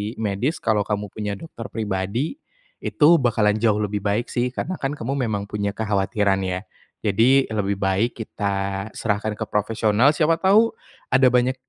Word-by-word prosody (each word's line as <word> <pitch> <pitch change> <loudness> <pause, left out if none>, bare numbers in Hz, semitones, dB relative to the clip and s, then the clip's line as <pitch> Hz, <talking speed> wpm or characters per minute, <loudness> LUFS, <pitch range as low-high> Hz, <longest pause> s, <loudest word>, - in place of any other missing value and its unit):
medis. 110 +7 -2
Kalau 105 -3 +1
kamu 105 -2 -2
punya 105 -1 -4
dokter 115 -2 -9
pribadi, 110 - -3 0.4
itu 165 +2 +5
bakalan 110 -5 +2
jauh 110 -2 +3
lebih 105 -1 -1
baik 105 +4 0
sih, 125 0 0
karena 185 - -3
kan 135 - -1
kamu 135 0 -3
memang 105 -2 -2
punya 100 0 -2
kekhawatiran 100 -2 +1
ya? 90 0 -2 0.4
Jadi 120 +7 +4
lebih 100 -2 0
baik 95 +5 +1
kita 100 -1 -3
serahkan 105 0 -1
ke - - -4
profesional, 110 +4 +2
siapa 160 +2 +3
tahu 210 +5 +4 0.4
ada 130 +1 +5
banyak, 125 +1 +2
110 Hz, 155 wpm, -22 LUFS, 100-125 Hz, 0.4 s, itu